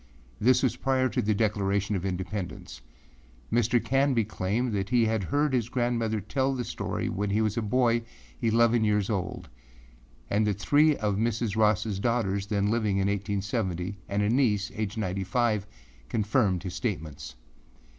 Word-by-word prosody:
This 125 +4 +4
was 130 - +1
prior 130 -1 +1
to 105 - 0
the 105 0 +1
Declaration 100 -1 0
of 95 0 -2
Independence. 95 -3 -5 0.7
Mr. 120 +1 +3
Canby 135 -2 +2
claimed 110 +4 -1
that 100 -1 -2
he 120 -2 +3
had 110 -3 0
heard 145 +3 +1
his 120 -3 0
grandmother 120 -3 0
tell 130 +7 -1
the 125 - -2
story - - -3
when 105 +1 -2
he 105 +2 +1
was 110 -2 +1
a 115 - 0
boy 120 +1 +2 0.4
eleven 115 0 +3
years 105 0 +1
old, 95 -3 -3 0.8
and 105 +1 +1
that 100 -2 0
three 150 +7 +4
of 105 -3 -1
Mrs. 115 -1 -1
Rossâ 105 -2 +1
daughters 100 -5 0
then 100 0 +1
living 110 -4 +1
in 100 0 +1
1870 100 -2 -2
and 100 +1 0
a 105 - +1
niece, 110 -6 +2
aged 110 0 -3
ninety 95 -2 -2
five, 105 0 0 0.4
confirmed 105 -4 +1
his 90 -2 -5
statements. 75 - -4
105 Hz, 160 wpm, -27 LUFS, 100-120 Hz, 0.8 s, This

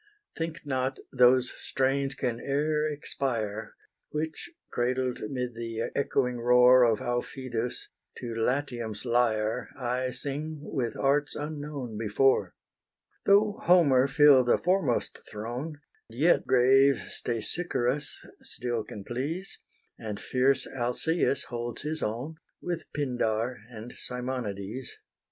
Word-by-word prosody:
Think 165 +1 -4
not 130 -1 -1 0.2
those 125 0 +5
strains 135 +1 0
can 120 -3 -2
e'er 150 +3 0
expire, 115 -7 -3 0.3
Which, 160 - -4 0.2
cradled 125 +1 0
'mid 125 -2 -3
the 115 -1 -4
echoing 125 -3 0
roar 125 +1 +6
Of 115 -3 +3
Aufidus, 120 -1 -3 0.3
to 120 -2 -5
Latium's 120 -2 -2
lyre 115 -1 +1
I 125 0 -1
sing 145 +4 -3
with 120 -7 -3
arts 145 +2 +1
unknown 145 -6 -5
before. 115 +5 +2 0.7
Though 205 +1 +4
Homer 145 -7 +5
fill 145 -2 +6
the 120 - +3
foremost 180 -9 0
throne, 125 +8 -5 0.3
Yet 140 +10 +2
grave 135 +2 +5 0.2
Stesichorus 125 +3 -2 0.2
still 120 -2 -3
can 105 - -9
please, 145 - -4 0.4
And 105 -3 -5
fierce 130 +2 +2
Alcaeus 135 +3 0
holds 120 +1 -5
his 155 +1 -3
own, 125 +9 -3 0.2
With 175 -2 -4
Pindar 125 -4 -1
and 115 0 -9
Simonides. 125 -2 -4
130 Hz, 110 wpm, -28 LUFS, 120-145 Hz, 0.7 s, roar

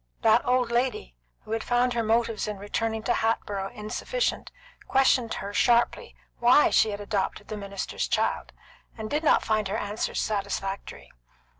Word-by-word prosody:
That 225 +2 +4
old 250 -1 +2
lady 235 - -1 0.3
who - - -12
had 225 0 -1
found 245 0 +1
her 235 - 0
motives 225 -1 0
in 210 -1 -4
returning 220 +2 -2
to 240 - +1
Hatboro' 205 -3 -1
insufficient 230 - -2 0.4
questioned 260 -3 +3
her 200 +1 -6
sharply 235 +3 +2 0.2
why 245 +5 +5
she 220 - +4
had 205 -1 -4
adopted 205 -2 -3
the 215 - -4
minister's 200 -1 -4
child, - - -1 0.5
and 220 -1 -6
did 300 +2 0
not 305 - +3
find 215 -2 +1
her 200 +3 -2
answers 205 0 -3
satisfactory. 200 -1 -3
220 Hz, 155 wpm, -26 LUFS, 205-240 Hz, 0.5 s, why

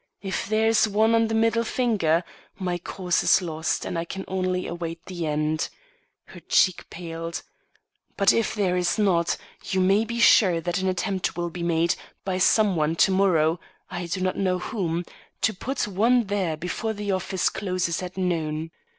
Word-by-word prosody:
If 190 -1 -3
there 220 +1 +2
is 225 0 +4
one 215 +2 +3
on 225 0 +3
the 225 - -1
middle 230 +1 +2
finger, 205 -10 +1 0.3
my 180 -2 -2
cause 180 0 -1
is - - +5
lost, 160 -3 -2
and 170 - -2
I - - -1
can 190 +3 -6
only 185 -1 -1
await 170 -1 -5
the 175 -3 -4
end." 155 +1 -1 0.6
Her - - -12
cheek 185 -2 +2
paled. 165 -1 -6 0.7
"But 200 -2 +5
if 230 -1 0
there 190 -4 +1
is 180 +3 +1
not, 180 -5 +2 0.3
you 190 - -1
may 195 +3 +4
be 235 +1 -4
sure 185 -7 +6
that 175 +2 -2
an 190 - -1
attempt 185 0 -2
will 175 -1 -2
be 175 - -6
made 170 0 +2 0.3
by 185 -1 -1
some 205 +1 +4
one 155 0 +1
to 190 - +4
morrow 175 -4 +3 0.3
I 175 -1 -4
do 185 +2 -3
not 185 0 0
know 185 -2 +1
whom 180 -4 -2 0.4
to 220 - +2
put 255 +5 -3
one 230 +5 +3
there 195 -6 -1
before 180 +7 -3
the 205 -1 -3
office 190 0 0
closes 185 -3 -2
at 185 +1 -7
noon. 160 -3 -1
185 Hz, 180 wpm, -25 LUFS, 170-205 Hz, 0.7 s, sure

